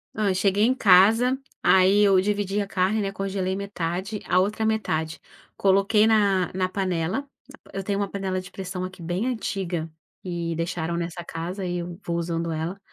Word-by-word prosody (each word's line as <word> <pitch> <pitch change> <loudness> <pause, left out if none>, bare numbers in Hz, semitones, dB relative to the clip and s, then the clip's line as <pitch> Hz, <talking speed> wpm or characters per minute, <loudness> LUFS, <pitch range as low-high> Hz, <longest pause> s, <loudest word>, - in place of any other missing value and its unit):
Ah, 210 -2 +1
eu 185 - +1
cheguei 200 +2 +2
em 250 +3 +3
casa, 225 +4 +5 0.3
aí 190 +2 +5
eu 195 -2 +5
dividi 205 0 -1
a 200 - -3
carne, 195 +3 +1
né. 195 -1 -2
Congelei 195 -1 -2
metade, 195 +1 -3
a 180 - +3
outra 210 +4 0
metade 160 -8 -1 0.4
coloquei 200 +2 +4
na 200 -4 +3
na 185 0 0
panela. 185 +6 -2 0.5
Eu 195 - -3
tenho 200 +1 -1
uma 200 - 0
panela 190 -1 -2
de 185 0 -10
pressão 185 -1 -5
aqui 185 -1 -7
bem 175 +6 -2
antiga 185 -9 -3 0.3
e 170 -2 -3
deixaram 170 0 -2
nessa 175 0 -4
casa 175 +4 -5
e 175 0 -2
eu 175 +2 -7
vou 170 - -2
usando 170 0 -2
ela. 165 +5 -3
190 Hz, 175 wpm, -25 LUFS, 175-200 Hz, 0.5 s, casa